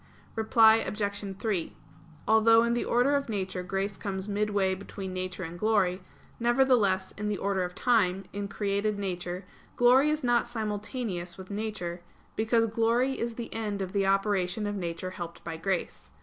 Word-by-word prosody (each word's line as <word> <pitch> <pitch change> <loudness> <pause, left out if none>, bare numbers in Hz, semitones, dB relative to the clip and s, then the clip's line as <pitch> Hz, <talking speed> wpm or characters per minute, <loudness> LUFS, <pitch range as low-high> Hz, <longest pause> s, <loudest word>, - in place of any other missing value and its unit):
Reply 220 0 +6
Obj. 205 -2 -3
3: 195 -5 -2 0.5
Although 225 +1 +6
in 235 0 +1
the 240 - 0
order 250 +4 +3
of 280 -3 -1
nature 190 -3 -2
grace 195 +2 -2
comes 190 -1 -4
midway 205 -2 +1
between 190 0 -6
nature 185 0 -4
and 170 +1 -7
glory, 200 -4 +2 0.4
nevertheless, 235 -6 +3
in 210 +1 -4
the 205 - -1
order 195 -2 0
of 180 0 -5
time, 195 -5 +2
in 200 0 -3
created 200 +1 -1
nature, 180 -1 -4 0.3
glory 255 +4 +5
is 305 -1 -1
not 240 -1 +2
simultaneous 210 -4 -4
with 190 +1 -10
nature; 200 -5 -4 0.3
because 225 +1 +2
glory 230 +4 +1
is 235 0 -2
the 235 -1 -6
end 210 -3 -3
of 190 -1 -3
the 195 -1 +1
operation 195 0 +1
of 205 0 -2
nature 175 -1 -4
helped 170 -2 -7
by 165 -1 -5
grace. 180 +2 -3
205 Hz, 165 wpm, -28 LUFS, 185-225 Hz, 0.5 s, Reply